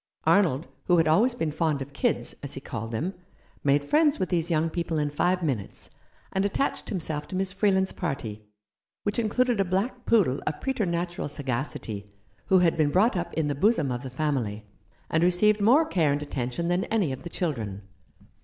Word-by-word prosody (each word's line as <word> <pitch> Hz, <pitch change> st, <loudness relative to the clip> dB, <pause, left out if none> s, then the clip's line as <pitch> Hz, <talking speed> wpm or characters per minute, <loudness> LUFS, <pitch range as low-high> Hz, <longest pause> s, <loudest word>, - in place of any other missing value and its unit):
Arnold, 165 Hz, -7 st, +3 dB, 0.2 s
who 175 Hz, -, +4 dB
had 165 Hz, -1 st, +3 dB
always 225 Hz, +11 st, +4 dB
been 160 Hz, -10 st, -1 dB
fond 155 Hz, -1 st, 0 dB
of 140 Hz, +1 st, -7 dB
"kids," -, -, 0 dB
as 140 Hz, -, -5 dB
he -, -, -6 dB
called 115 Hz, -4 st, -6 dB
them, 160 Hz, +12 st, -2 dB, 0.5 s
made 145 Hz, 0 st, +3 dB
friends 305 Hz, -1 st, +4 dB
with 185 Hz, -, -1 dB
these 170 Hz, -2 st, 0 dB
young 165 Hz, -1 st, +2 dB
people 165 Hz, -1 st, -2 dB
in 150 Hz, -1 st, 0 dB
five 180 Hz, +4 st, +1 dB
minutes, 125 Hz, -11 st, -4 dB, 0.4 s
and 190 Hz, -, +1 dB
attached 205 Hz, +8 st, -1 dB
himself 160 Hz, -6 st, -3 dB
to 185 Hz, -, -6 dB
Miss 190 Hz, 0 st, 0 dB
Freeland's 190 Hz, -1 st, +2 dB
party, 120 Hz, -, -4 dB, 0.6 s
which 205 Hz, +2 st, -1 dB
included 235 Hz, +1 st, +1 dB
a -, -, +5 dB
black 200 Hz, +7 st, -2 dB
poodle 175 Hz, -, +3 dB
of 150 Hz, -, -2 dB
preternatural 175 Hz, -, -1 dB
15 145 Hz, -1 st, -6 dB
Rough 120 Hz, -3 st, +1 dB
Justice. 140 Hz, -, -4 dB
sagacity, 105 Hz, -2 st, -7 dB, 0.4 s
who 190 Hz, -, +5 dB
had 175 Hz, -2 st, +4 dB
been 155 Hz, -2 st, +3 dB
brought 195 Hz, +9 st, +3 dB
up 175 Hz, -1 st, -2 dB
in 160 Hz, -2 st, +1 dB
the 145 Hz, -, 0 dB
bosom 160 Hz, -, +2 dB
of 120 Hz, 0 st, -3 dB
the 130 Hz, -, -6 dB
family, 125 Hz, -7 st, -2 dB, 0.5 s
and 160 Hz, -, +2 dB
received 205 Hz, +4 st, +4 dB
more 260 Hz, +10 st, +5 dB
care 165 Hz, -, +2 dB
and 145 Hz, +1 st, -1 dB
attention 135 Hz, +3 st, -3 dB
than 175 Hz, +2 st, +1 dB
any 205 Hz, -10 st, 0 dB
of 130 Hz, -, -5 dB
the 170 Hz, -, -7 dB
children. 110 Hz, -, -3 dB
165 Hz, 200 wpm, -27 LUFS, 140-195 Hz, 0.6 s, a